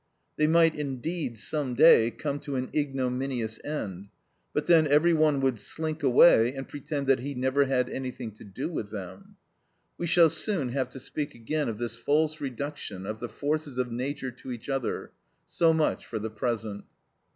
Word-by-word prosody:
They 150 - +2
might 165 0 +5
indeed, 145 -1 -3
some 135 +2 -2
day, 130 -5 +7
come 140 +5 -4
to 140 -1 -5
an 130 0 -3
ignominious 130 -5 -2
end; 100 -11 -5 0.4
but - - -1
then 160 -3 +5
every 150 +4 +4
one 155 -3 +3
would 130 -4 +1
slink 160 +4 -3
away 130 -2 +6
and 135 0 -6
pretend 145 0 -4
that 135 -1 +3
he 140 +3 -5
never 130 +2 +2
had 130 -2 +1
anything 125 -3 -5
to 105 - -14
do 105 +6 -5
with 145 -11 -4
them. 95 -3 -9 0.6
We 170 - -1
shall 165 -1 +6
soon 165 - 0
have 130 0 -1
to 135 - -7
speak 145 +3 -5
again 145 +5 -2
of 110 - -4
this 120 0 -4
false 155 +5 +1
reduction 135 -7 -5
of 110 +2 -5
the 120 - -5
forces 145 +3 -2
of 125 -1 -1
nature 130 +2 -3
to 125 +1 -10
each 120 +2 -7
other; 135 -3 -2 0.4
so 165 -1 +3
much 160 -1 +1
for 115 - -4
the 110 +1 -4
present. 110 -2 -3
135 Hz, 180 wpm, -28 LUFS, 120-150 Hz, 0.6 s, day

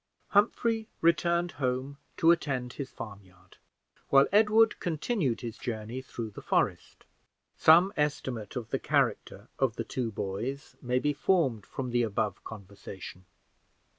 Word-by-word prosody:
Humphrey 220 +2 +2
returned 170 +1 +2
home 130 +1 -3 0.2
to 165 - +6
attend 130 -7 -1
his 140 -2 -6
farmyard, 95 -4 -12 0.5
while 135 0 +6
Edward 215 +2 +4
continued 160 - -1
his 115 -2 -6
journey 115 +1 -4
through 115 -3 -6
the - - -10
forest. - - -1 0.5
Some 175 +5 +6
estimate 130 -8 -2
of 115 -3 -5
the - - 0
character - - 0
of 130 -4 +1
the 115 - -3
two 120 -2 -3
boys 110 +8 -4
may 125 0 0
be 145 +3 +1
formed 145 - +1
from 130 -3 -5
the 120 0 +2
above 110 -2 -1
conversation. 95 -3 -10
130 Hz, 135 wpm, -29 LUFS, 110-165 Hz, 0.5 s, to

